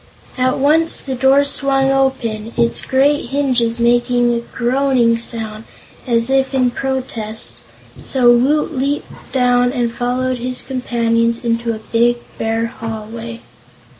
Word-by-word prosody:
At 255 0 +1
once 315 +4 +3
the 270 - -5
door 265 +2 +4
swung 275 -1 +1
open, 235 -5 -1
its 235 -1 +1
great 275 +1 +1
hinges 250 -4 0
making 240 0 +2
a 235 - 0
groaning 245 0 +1
sound 225 -2 -4 0.4
as 235 +1 +1
if 270 0 +1
in 250 -2 +2
protest, 230 - -4 0.4
so 250 -3 +3
Woot 295 +5 +1
leaped 280 +3 -4
down 245 -1 +2
and 240 -3 -1
followed 250 +1 -1
his 250 +1 -2
companions 235 -2 -1
into 230 0 0
a 220 - -13
big, 240 +1 +3 0.2
bare 225 +1 0
hallway. 230 +1 -7
245 Hz, 130 wpm, -17 LUFS, 230-265 Hz, 0.4 s, door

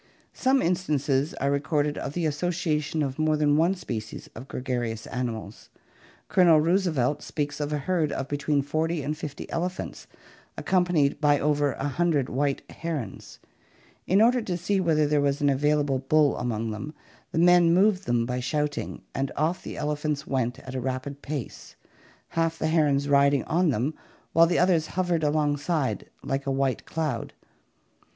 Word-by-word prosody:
Some 265 +1 +2
instances 150 -5 0
are 140 - 0
recorded 145 +1 0
of 140 - -5
the 175 0 -1
association 155 -1 -1
of 135 +1 -4
more 155 0 +2
than 145 -1 +3
one 170 +5 +3
species 110 - -6
of 125 +4 -9
gregarious 120 -4 -3
animals. 115 -5 -5 0.6
Colonel 170 -4 +5
Roosevelt 155 -5 +1
speaks 145 -1 -3
of 145 0 -2
a 150 - 0
herd 155 +1 0
of 135 - -3
between 145 0 0
forty 155 +2 -1
and 150 +3 -2
fifty 150 -2 -7
elephants, 180 +2 -4 0.5
accompanied 175 -6 +1
by 145 -1 +4
over 145 -1 +1
a 140 - -3
hundred 145 -2 +1
white 140 +2 -1
herons. 150 - -5 0.7
In 195 +4 +5
order 245 +2 +4
to 185 -5 -3
see 195 +3 0
whether 160 -4 +2
there 145 0 +2
was 140 0 +1
an 145 - +3
available 145 -1 +1
bull 145 +2 +3
among 115 -2 -2
them, 135 +9 -6 0.4
the - - -4
men 175 0 +6
moved 195 +2 +3
them 120 -1 +2
by 125 +1 -2
shouting, 150 +3 -2
and 135 0 -2
off 160 +4 0
the - - -7
elephants 150 0 -2
went 125 -2 -1
at 130 - -9
a 130 - -3
rapid 130 +2 -4
pace, 145 -4 -6 0.5
half 165 0 0
the 160 - -1
herons 145 -3 +2
riding 140 -1 +4
on 170 +1 +1
them 130 +4 0 0.4
while 165 +1 +6
the 175 - +1
others 175 -3 +3
hovered 175 -3 +1
alongside, 150 0 0
like 135 +1 -2
a - - +1
white 135 -1 0
cloud. 150 -7 -3
150 Hz, 160 wpm, -26 LUFS, 135-165 Hz, 0.7 s, men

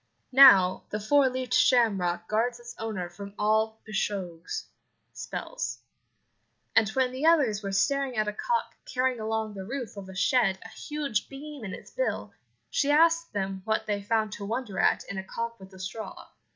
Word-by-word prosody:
Now, 200 -9 +8
the 210 - -3
four 270 +5 +4
leaved 255 -1 -3
shamrock 190 -10 +3
guards 235 +3 0
its 240 0 -9
owner 215 -6 -3
from 200 +3 -10
all 220 +1 +1
pishogues 195 -5 -3 0.5
(spells), 125 0 -5 1.0
and 220 -1 +5
when 260 -1 +2
the 265 +5 0
others 265 -11 +4
were 200 -1 -4
staring 270 +5 +1
at 215 0 +1
a 210 - -1
cock 470 - -1 0.2
carrying 255 -1 +1
along 220 0 -2
the 195 -1 -6
roof 240 0 -5
of 195 -1 -8
a 190 - -9
shed 195 -1 +3
a - - -8
huge 285 -1 -3
beam 285 -1 -9
in 190 -3 -5
its - - -13
bill, - - -2 0.4
she 285 - +1
asked 330 +2 +4
them 195 -1 -2
what 220 +1 0
they 205 -1 -1
found 215 +1 0
to 210 - -7
wonder 220 -2 -3
at - - +3
in 195 - -5
a - - -5
cock 230 +4 -5
with 190 0 -13
a 190 - -13
straw. 195 +4 -7
220 Hz, 180 wpm, -28 LUFS, 195-255 Hz, 1.0 s, Now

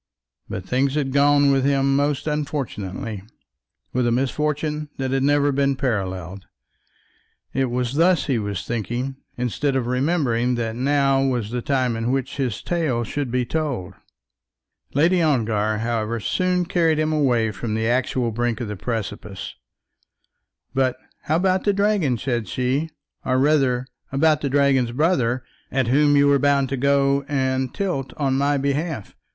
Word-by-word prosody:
But 95 - -5
things 135 +2 +1
had 135 -3 -1
gone 145 0 +4
with 135 -1 +2
him 135 0 +2
most 145 -1 0
unfortunately, 135 -8 -3 0.7
with 125 -1 +1
a - - +2
misfortune 150 +4 -1
that 130 -1 -2
had 135 0 +1
never 145 +1 +3
been 140 0 +1
paralleled. 95 -7 -3 1.1
It 135 +1 +1
was 125 0 -1
thus 170 0 +3
he 130 -4 0
was 100 -3 -4
thinking 120 +4 -3 0.2
instead 125 +3 -1
of 130 -3 0
remembering 125 -2 +1
that 115 -2 -2
now 135 +1 +2
was 120 -5 -1
the 125 0 -2
time 130 -2 0
in 115 +1 -2
which 135 +1 -2
his 130 -6 -2
tale 155 -9 0
should 140 +3 -3
be 125 +1 0
told. 130 - -3 1.0
Lady 170 +5 +4
Ongar, 110 -8 +1
however, 115 0 -1
soon 180 - 0
carried 165 -3 +2
him 155 0 +1
away 120 -7 +2
from 110 +2 -4
the 110 0 0
actual 125 0 0
brink 120 0 -1
of 120 - -3
the 105 - -4
precipice. 105 -2 -5 1.2
"But 130 -1 +1 0.3
how 155 - +1
about 185 +2 +2
the 205 - +2
dragon," 200 - +1
said 120 -2 -2
she, 130 +8 -1 0.3
"or 130 - +1
rather 135 -3 +2 0.3
about 150 +2 +3
the 140 - -1
dragon's 135 -3 +2
brother, 130 -5 +1 0.3
at 130 -3 0
whom 145 +2 +4
you 140 - +5
were 140 -1 +4
bound 140 -2 +2
to 135 - -1
go 140 +1 +2
and 130 -2 0
tilt 155 -11 -3
on 140 -3 +1
my 140 +1 +2
behalf? 140 - -2
135 Hz, 155 wpm, -22 LUFS, 120-145 Hz, 1.2 s, you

